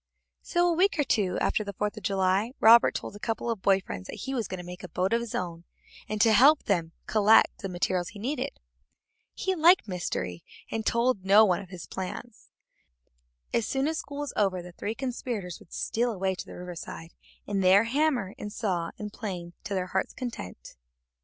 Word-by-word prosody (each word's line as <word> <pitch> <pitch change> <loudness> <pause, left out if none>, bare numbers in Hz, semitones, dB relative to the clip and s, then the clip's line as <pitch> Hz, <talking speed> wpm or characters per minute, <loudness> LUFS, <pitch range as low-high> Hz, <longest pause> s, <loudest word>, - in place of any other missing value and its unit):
So, 350 0 +1
a 345 - +3
week 370 +3 +2
or 295 - +3
two 200 -9 +1
after 215 - +1
the 200 -1 -6
Fourth 210 +2 -2
of 215 - -8
July, 195 +4 +1
Robert 230 +2 +7
told - - -5
a - - -9
couple 225 +1 -2
of 220 -4 -4
boy 195 0 +3
friends 95 - -7
that - - -6
he 270 - -4
was 235 -5 -1
going 185 - -5
to 180 - -7
make 180 +1 -8
a 180 - -8
boat 185 +6 0
of 235 - +2
his 235 -2 -5
own, 170 -2 -4 0.5
and 215 0 -2
got - - +6
them 225 - +5
to - - +5
help 280 +7 +6
him 170 -6 +1
collect 215 0 +4
the 195 - -4
materials 180 0 -1
he 210 - -12
needed. 275 - -3 0.8
He 380 - -1
liked 345 -5 +5
mystery, 175 - -3 0.3
and 225 -1 -2
told 240 +1 +2
them 190 - -24
to - - -8
tell 200 +2 +6
no - - +7
one 180 -4 +1
of 190 - -12
his 175 -5 -8
plans. 200 - -7 1.0
As 230 -2 +1
soon 270 +1 0
as 320 0 -1
school 285 -1 -6
was 290 - -4
over 190 -3 +1
the 180 - -10
three 210 +5 -4
conspirators 235 -8 -4
would - - -19
steal 240 +1 -1
away 190 -2 -1
to 185 - -7
the - - -9
riverside, 175 -2 -8 0.3
and 200 -1 -1
there 190 +3 +6
hammer 250 -5 0
and 210 - -5
saw 180 -7 -1
and 210 -1 -6
plane 180 -5 -6
to 200 - -3
their 185 -1 0
hearts' 190 +1 -2
content. 95 - -7
205 Hz, 220 wpm, -28 LUFS, 185-235 Hz, 1.0 s, Robert